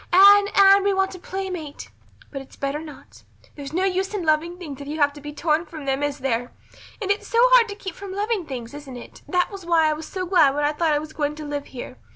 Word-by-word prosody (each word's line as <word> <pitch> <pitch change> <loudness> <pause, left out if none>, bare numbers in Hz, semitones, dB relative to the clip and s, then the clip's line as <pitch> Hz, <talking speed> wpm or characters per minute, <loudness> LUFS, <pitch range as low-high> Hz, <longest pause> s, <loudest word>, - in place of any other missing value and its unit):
Anne, 400 +2 +7
Anne, 395 0 +7
we 400 - +2
want 385 0 0
a 370 - -9
playmate' 365 -6 -6 0.4
but 275 - -5
it's 270 - -15
better 280 +2 -3
not. 305 -3 -12 0.3
There 285 - -8
is 275 - -7
no 360 +4 0
use 385 +2 -1
in 370 -5 -3
loving 320 +3 +1
things 295 -6 -8
if 280 - -8
you 305 +2 -5
have 285 -1 +3
to 290 - -12
be 295 +1 -7
torn 310 +1 0
from 305 -2 -9
them, 270 0 -1
is 290 -1 -1
there? 245 -3 -2 0.5
And 400 -2 -1
it's 405 - -2
so 460 - -2
hard 485 -3 +6
to 405 - -6
keep 385 -3 -7
from 395 +1 -9
loving 405 -2 -2
things, 245 -2 -7
isn't 285 -3 -9
it? 240 - -12
That 360 -1 0
was 395 -2 -8
why 335 -2 +3
I 310 - +2
was 310 +1 -7
so 370 -1 -4
glad 315 -7 +4
when 295 - -1
I 295 - +2
thought 315 0 +1
I - - +2
was 310 +1 -6
going 295 -1 -2
to 305 0 -8
live 290 -1 -4
here. 250 - -9
315 Hz, 265 wpm, -23 LUFS, 290-380 Hz, 0.5 s, Anne